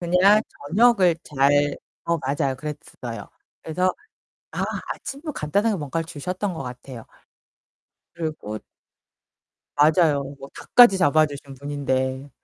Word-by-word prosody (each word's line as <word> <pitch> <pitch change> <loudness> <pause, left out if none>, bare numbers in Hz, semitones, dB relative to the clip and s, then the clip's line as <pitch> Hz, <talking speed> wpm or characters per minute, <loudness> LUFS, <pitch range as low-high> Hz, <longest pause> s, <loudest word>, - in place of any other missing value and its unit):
그냥 180 +5 +5 0.3
저녁을 195 -4 +4
잘 145 0 +2 0.3
어 170 - +2
맞아요 140 -1 -1
그랬어요. 125 -6 -7 0.3
그래서 180 +3 0 0.6
아 - - -2 0.3
아침도 295 +2 -7
간단하게 200 - 0
뭔가를 165 +2 -3
주셨던 180 +5 -4
것 135 - -5
같아요. 125 -1 -9 1.1
그리고 155 -11 -5 1.2
맞아요. 150 -1 +4 0.2
뭐 135 - -10
닭까지 240 -6 +6
잡아주신 145 -4 +1
분인데. 135 -1 -2
150 Hz, 250 characters per minute, -23 LUFS, 140-180 Hz, 1.2 s, 닭까지